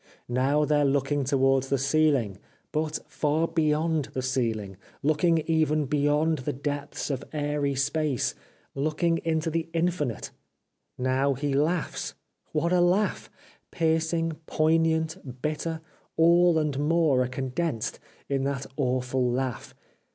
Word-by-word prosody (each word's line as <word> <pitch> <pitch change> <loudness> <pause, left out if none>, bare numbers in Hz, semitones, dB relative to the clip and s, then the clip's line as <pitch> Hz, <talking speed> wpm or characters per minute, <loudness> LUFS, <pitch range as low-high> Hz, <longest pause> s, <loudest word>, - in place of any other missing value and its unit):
Now 135 +5 +2
they 150 0 +2
are - - +3
looking 140 +1 +1
towards 135 -1 +2
the 140 - +2
ceiling 135 -8 +2 0.2
— - - -39
but 155 0 -1
far 155 +2 0
beyond 155 -1 +1
the 130 - -2
ceiling, 110 -7 -1 0.3
looking 160 +2 +2
even 155 -2 +2
beyond 150 +2 +1
the 130 - -3
depths 145 +2 -4
of 135 0 -3
airy 145 -2 -1
space, 145 -1 0 0.4
looking 155 +4 0
into 160 0 -1
the 165 +1 -2
infinite. 165 -8 -1 0.7
Now 130 +2 +1
he 140 +1 -2
laughs! 155 +4 -1 0.4
What 165 +3 +1
a 180 - +4
laugh! 185 +4 +1 0.4
Piercing, 165 0 0
poignant, 160 -4 +1
bitter 160 +1 -2 0.2
— - - -39
all 170 +1 +5
and 150 -3 0
more 150 -3 +3
are 125 - +1
condensed 130 0 -3 0.3
in 135 -1 0
that 140 -1 -2
awful 125 -2 0
laugh. 130 -2 -3
150 Hz, 130 wpm, -27 LUFS, 135-160 Hz, 0.7 s, all